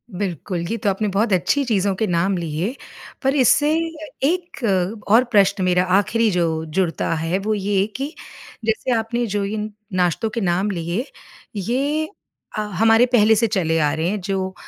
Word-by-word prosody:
बिल्कुल, 180 -1 -3
ये - - 0
तो 220 -3 0
आपने 200 +2 -1
बहुत 205 +1 +1
अच्छी 280 +10 +2
चीज़ों 200 -4 +1
के 220 - 0
नाम 180 +2 +1
लिए, 170 - -3 0.5
पर 270 +2 +2
इससे 290 +3 +4 0.6
1 350 -4 -3 0.4
और 225 +5 +6
प्रश्न 200 -2 +3
मेरा 180 0 +3 0.2
आख़िरी 225 +2 +1
जो 175 -2 +1 0.2
जुड़ता 165 +1 -1
है 165 +3 -1
वो 215 +2 -1
ये 200 -1 +1
कि 275 +4 -4 0.5
जैसे 225 +3 0
आपने 235 +2 -1
जो 205 -1 -1
इन 215 +1 -3 0.2
नाश्तों 180 +4 +1
के 230 +1 -3
नाम 185 +2 +1
लिए, 175 +7 -2 0.5
ये 275 - -1 0.5
अ, 215 - +1
हमारे 225 +4 +3
पहले 220 -3 +4
से 230 +1 +2
चले 175 -6 0
आ 150 -2 +2
रहे 160 +1 -1
हैं 210 - -2
जो 190 0 -2
205 Hz, 170 wpm, -21 LUFS, 180-230 Hz, 0.6 s, और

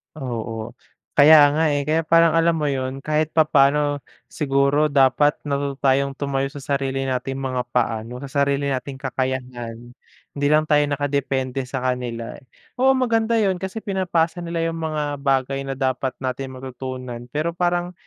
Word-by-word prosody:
Oo, 115 -4 -5 0.5
kaya 145 0 +8
nga 160 +2 +1
eh, 145 - 0
kaya 155 +3 +1
parang 165 -1 +5
alam 165 0 +3
mo 150 -2 -1
yun, 135 0 -3
kahit 155 0 0
papaano 145 -1 +3 0.3
siguro 140 +1 +2
dapat 145 +2 +3
matuto 140 -1 -3 0.3
tumayo 135 -1 -1
sa 140 +1 -9
sarili 135 -1 -1
nating 130 0 -2
mga 130 -2 -3
paa 110 -3 0
'no, 125 +2 -8
sa 140 - -7 0.2
sarili 140 0 0
nating 135 +1 -3
kakayahan, 125 -3 -4 0.5
hindi 145 - +1
lang 155 +1 +4
tayo 150 -1 +4
nakadepende 135 -2 -1
sa 130 0 -4
kanila. 125 -2 -3 0.4
Oo, 265 +1 +5
maganda 230 -2 +1
yun 195 -4 +2
kasi 190 +4 -5
pinapasa 180 -4 0
nila 170 -1 -3
yung 165 - -6
mga 150 -2 -2
bagay 135 0 0
na 135 - -2
dapat 130 -1 -1
nating 130 +1 -4
matutunan, 130 -2 -7
pero 155 +3 0
parang 175 0 -1
140 Hz, 155 wpm, -22 LUFS, 130-155 Hz, 0.5 s, kaya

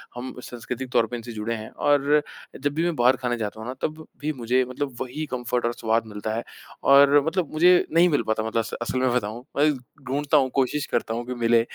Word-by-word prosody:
हम 125 +1 -6
सांस्कृतिक 125 +1 -6
तौर 115 -1 +3
पर 120 - -5
इनसे 120 0 -7
जुड़े 110 +1 -3
हैं 110 0 -7
और 145 -1 +2 0.6
जब 145 +1 0
भी 165 +2 0
मैं 175 -2 0
बाहर 125 +1 +4
खाने 120 -2 -2
जाता 110 0 -4
हूँ 110 - -7
ना, 130 - -3
तब 155 0 -3 0.2
भी 155 +1 -1
मुझे 125 0 +1
मतलब 135 0 -4
वही 130 +5 -4
कम्फ़र्ट 125 -1 -1
और 120 - 0
स्वाद 115 0 0
मिलता 105 +1 -4
है। 115 - -2 0.4
और 140 +1 +7
मतलब 165 0 -1
मुझे 180 +3 +5
नहीं 175 +2 +5
मिल 145 - +2
पाता 110 0 0
मतलब 115 +1 0
अस 115 - -3
असल 130 +2 -1
में 130 -1 +2
बताऊँ, 115 0 -2 0.2
अय 150 +1 +5 0.4
ढूँढ़ता 145 +3 +2
हूँ, 130 -2 +3
कोशिश 135 +2 +1
करता 110 - 0
हूँ, 120 +1 -3
कि 125 - -4
मिले 115 -1 +3
125 Hz, 230 wpm, -24 LUFS, 115-145 Hz, 0.6 s, और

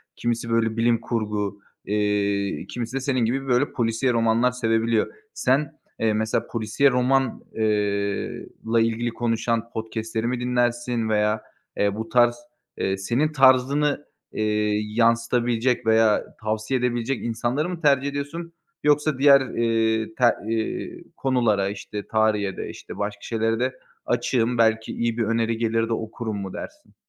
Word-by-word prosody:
Kimisi 115 0 -2
böyle 115 -1 +1
bilim 115 0 +2
kurgu, 105 -3 -2 0.3
eee, 100 -1 0
kimisi 120 +1 -5
de - - +1
senin 130 -1 0
gibi 135 +4 -1
böyle 125 +2 +2
polisiye 115 +1 0
romanlar 115 +2 +3
sevebiliyor. 115 -2 +1 0.2
Sen, 140 +3 0 0.2
eee, 110 -1 +2
mesela, 110 +1 -1
polisiye 115 +5 +2
roman 125 0 +1
eee, 105 -2 -1 0.2
la 115 +1 +2
ilgili 115 +1 0
konuşan 115 0 -1
podcast'leri 110 0 -3
mi 125 0 -1
dinlersin 120 -1 0
veya, 105 0 +1 0.4
eee, 100 0 +1
bu 110 +1 -5
tarz, 120 0 +4 0.4
eee, 95 0 -1
senin 120 +10 0
tarzını, 140 +1 +3 0.3
eee, 105 0 0
yansıtabilecek 115 +2 +1
veya 110 -1 +4 0.2
tavsiye 110 +4 -1
edebilecek 120 +1 -1
insanları 120 +7 -1
mı 175 -2 -5
tercih 140 -2 +3
ediyorsun 145 +4 -5 0.3
yoksa 150 -1 +2
diğer, 140 -1 +7
eee, 115 -3 0
te 125 - +3 0.2
eee, 115 -1 -3
konulara, 115 -7 +1
işte, 105 0 -6
tarihe 105 -3 +1
de, - - -5
işte, - - -9
başka 105 0 -3
şeylere 115 0 -1
de 130 +1 -2 0.3
açığım, 120 0 +1
belki 110 -1 +2
iyi 115 -1 -1
bir 115 - +1
öneri 115 +1 0
gelir 115 0 0
de - - +1
okurum 110 -1 -4
mu 95 -2 -5
dersin? 305 0 -9
115 Hz, 140 wpm, -24 LUFS, 110-125 Hz, 0.4 s, diğer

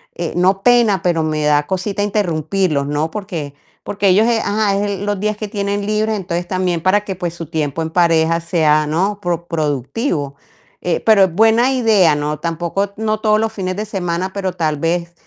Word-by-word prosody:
eh, 170 -2 -4
no 190 +2 +2
pena, 235 -7 +4
pero 165 -3 +1
me 155 -1 -1
da 150 0 +2
cosita 195 +2 -2
interrumpirlos, 175 -6 0
¿no? 150 +2 -1
Porque 175 -9 -5 0.3
porque 200 -1 0
ellos 210 +5 +4 0.2
ajá, 205 -1 +1
es 200 -2 -2
los 205 -1 -2
días 210 +1 -1
que 215 - -5
tienen 200 0 -2
libre, 215 +1 0
entonces 175 -3 -3
también 180 -3 -1
para 205 +2 +2
que, 190 -2 -4
pues, 175 -2 -4
su 170 -1 -6
tiempo 155 -1 -2
en 160 - -5
pareja 165 -1 +2
sea, 155 -3 +2
¿no?, 190 +6 0
pro 175 -2 -2
productivo. 145 - -2 0.5
Eh, 175 -2 0
pero 215 -3 +6
es 180 - -5
buena 225 +5 +4
idea 210 - +3
no, 150 0 -3
tampoco, 170 +5 -2
no 215 0 -1
todos 215 -1 +3
los 220 0 -1
fines 185 -3 -3
de 210 - -3
semana, 185 -2 -3
pero 190 -2 -3
tal 155 -4 -1
vez, 170 +3 -2
185 Hz, 190 wpm, -17 LUFS, 160-205 Hz, 0.5 s, pero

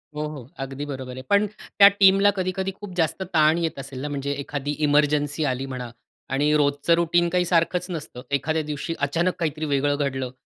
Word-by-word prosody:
हो, 150 - -3
हो, 140 -5 -9
अगदी 135 +1 -5
बरोबर 130 -3 -6
आहे. 130 - -7
पण 200 +1 +4
त्या 200 -1 +5
टीमला 195 +1 +6
कधी-कधी 185 +1 -1
खूप 205 -3 -8
जास्त 165 +3 0
ताण 155 +1 +4
येत 165 -4 -2
असेल 135 -1 -7
ना, 145 - -3
म्हणजे 140 -1 -3
एखादी 145 +1 -4
ईमर्जन्सी 145 0 +2
आली 130 +2 -4
म्हणा 125 -2 -6 0.4
आणि 145 +3 +1
रोजचं 145 +2 +2
रूटीन 170 0 +2
काही 180 0 +1
सारखंच 175 +1 +1
नसतं. 155 -7 -6
एखाद्या 155 +3 0
दिवशी 150 +2 -4
अचानक 165 +6 0
काहीतरी 155 -2 -2
वेगळं 145 0 +1
घडलं 130 -3 -2
150 Hz, 185 wpm, -24 LUFS, 140-170 Hz, 0.4 s, टीमला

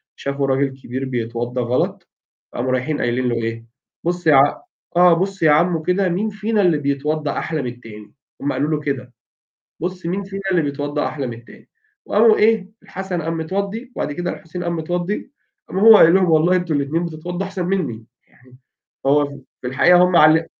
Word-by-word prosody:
شافوا 140 0 -2
راجل 135 +1 +1
كبير 130 +3 -4
بيتوضا 120 0 -3
غلط، 120 +1 -2 0.4
فقاموا 130 +2 -2
رايحين 130 +4 -1
قايلين 125 +1 0
له 120 - -1
إيه: 115 0 -4 0.4
"بص 175 0 -2
يا 150 - +7
ع 140 +2 +4 0.4
آه، 180 -1 +7
بص 190 +2 -1
يا 155 - +6
عمو 165 +2 +3
كده 180 +3 +1
مين 195 +5 -1
فينا 210 +1 -1
اللي 175 -5 +3
بيتوضا 145 +1 -2
أحلى 160 -2 -3
من 125 - -4
التاني،" 105 -4 -13 0.3
هم 140 0 -1
قالوا 145 +4 -1
له 155 - 0
كده، 135 -4 -4 0.7
"بص 180 0 -4
مين 190 +4 -2
فينا 195 0 -7
اللي 175 -3 +3
بيتوضا 145 0 -2
أحلى 140 -3 -4
من 120 - -5
التاني،" 115 +1 -16 0.4
وقاموا 220 +1 +5
إيه، 215 -3 +2
الحسن 185 -2 -5
قام 165 +1 -3
متوضي 200 +9 -4
وبعد 145 - -2
كده 175 +4 -3
الحسين 175 +2 -7
قام 170 0 -2
متوضي 175 +8 -3 0.4
قام - - -3
هو 220 +2 +9
قايل 165 -3 +7
لهم: 185 -2 +3
"والله 160 +3 +4
أنتم 180 -3 -1
الاتنين 145 +5 -1
بتتوضوا 175 +3 -5
أحسن 190 -2 -4
مني،" 150 - -2 0.2
يعني 125 0 -22 0.5
هو 145 +2 +4 0.4
في - - -5
الحقيقة 175 +8 +5
هم 180 -1 +2
عل 160 +1 +5
160 Hz, 185 wpm, -20 LUFS, 135-180 Hz, 0.7 s, هو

